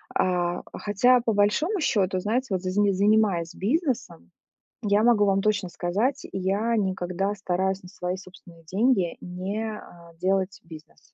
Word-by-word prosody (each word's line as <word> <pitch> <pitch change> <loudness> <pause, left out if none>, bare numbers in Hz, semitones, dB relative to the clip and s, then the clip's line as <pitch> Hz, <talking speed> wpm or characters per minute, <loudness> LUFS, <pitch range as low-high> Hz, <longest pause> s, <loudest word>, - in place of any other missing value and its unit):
А, 175 -1 +1
хотя 245 +5 +3
по 230 -1 0
большому 255 - +2
счёту, 195 - +1
знаете, 235 +7 -1
вот 185 -2 0
за 185 - -3
за 205 +1 +3
занимаясь 200 -4 +2
бизнесом, 225 - -2 0.5
я 205 0 +2
могу 230 -3 +5
вам 195 -1 +2
точно 200 -3 0
сказать, 210 +12 -1
я 200 +5 0
никогда 190 0 -1
стараюсь 190 0 -1
на 180 - -11
свои 180 -2 -4
собственные 180 -3 -15
деньги 190 +1 +1
не, 190 +5 -4
а, 170 -3 -14
делать 190 +1 0
бизнес. 160 -1 -14
195 Hz, 145 wpm, -25 LUFS, 180-215 Hz, 0.5 s, могу